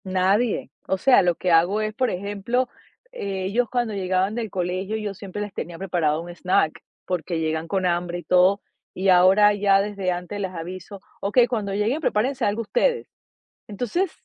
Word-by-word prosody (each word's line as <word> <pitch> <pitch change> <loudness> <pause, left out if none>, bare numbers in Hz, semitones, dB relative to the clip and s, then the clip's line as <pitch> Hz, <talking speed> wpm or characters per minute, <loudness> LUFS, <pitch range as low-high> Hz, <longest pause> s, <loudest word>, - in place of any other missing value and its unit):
Nadie. 195 +5 +1 0.2
O 190 - +1
sea, 260 +6 +5
lo 175 -2 +2
que 180 - -1
hago 175 +6 +4
es, 215 0 -2
por 255 +3 0
ejemplo, 205 +7 -2 0.4
ellos 200 - -2
cuando 240 -3 -1
llegaban 190 +1 0
del 230 -2 -3
colegio 185 +3 -2
yo 210 -2 -4
siempre 200 +1 -7
les 205 -1 -5
tenía 170 -1 -6
preparado 165 -5 0
un 170 - -9
snack 175 -3 0 0.2
porque 175 -1 -2
llegan 160 0 -2
con 190 +2 -1
hambre 175 0 -1
y - - -10
todo, 185 +2 +4 0.3
y 190 +1 0
ahora 190 +3 +6
ya 200 -1 +3
desde 200 -2 -2
antes 180 +3 -5
les 190 -2 -3
aviso: 185 +3 -8 0.2
"Okey, 220 +5 +4
cuando 215 -5 -2
lleguen 215 +8 0
prepárense 255 0 0
algo 210 +3 0
ustedes". 475 - 0 0.6
Entonces, 245 - -2
195 Hz, 175 wpm, -23 LUFS, 180-215 Hz, 0.6 s, ahora